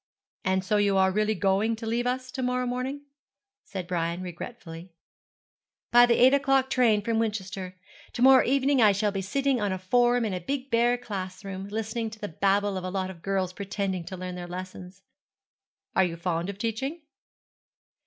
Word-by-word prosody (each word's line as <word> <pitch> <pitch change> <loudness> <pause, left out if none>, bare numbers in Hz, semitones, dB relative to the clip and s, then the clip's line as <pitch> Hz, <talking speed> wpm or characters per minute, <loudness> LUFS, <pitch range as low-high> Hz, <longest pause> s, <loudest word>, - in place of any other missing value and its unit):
'And 190 -2 0
so 210 +2 +2
you 200 -1 +2
are 190 0 +4
really 215 +2 +1
going 200 +4 +1
to 225 +1 -8
leave 235 +2 0
us 255 0 -2
to 260 - -4
morrow 250 0 0
morning?' 255 +3 -3 0.6
said 190 -3 -6
Brian, 170 0 -2
regretfully. 175 -1 -8 1.0
'By 240 0 +7
the 235 - +4
eight 255 +2 +6
o'clock 270 -1 +2
train 225 -5 +3
from 225 0 0
Winchester. 195 -4 -3 0.4
To - - -4
morrow 265 0 +8
evening 275 0 +2
I 210 -2 +6
shall 205 +1 0
be 195 -1 -3
sitting 270 +5 0
on 205 -2 0
a 185 - -1
form 240 +5 +2
in 210 - -2
a 180 - -2
big 270 +8 -4
bare 240 +1 +3
class 190 -5 -6
room, 195 0 -6
listening 220 +2 -3
to 215 0 -12
the 205 -1 -5
babble 200 +3 +1
of 185 - -5
a 185 - -3
lot 190 0 -2
of 170 -3 -14
girls 190 -1 -1
pretending 195 -2 -3
to 185 +2 -7
learn 180 0 -5
their 180 0 -6
lessons.' 185 +1 -8 0.9
'Are 190 - +5
you 170 -1 -4
fond 170 +1 -2
of 200 - -6
teaching?' 250 +9 -3
205 Hz, 190 wpm, -27 LUFS, 185-245 Hz, 1.0 s, morrow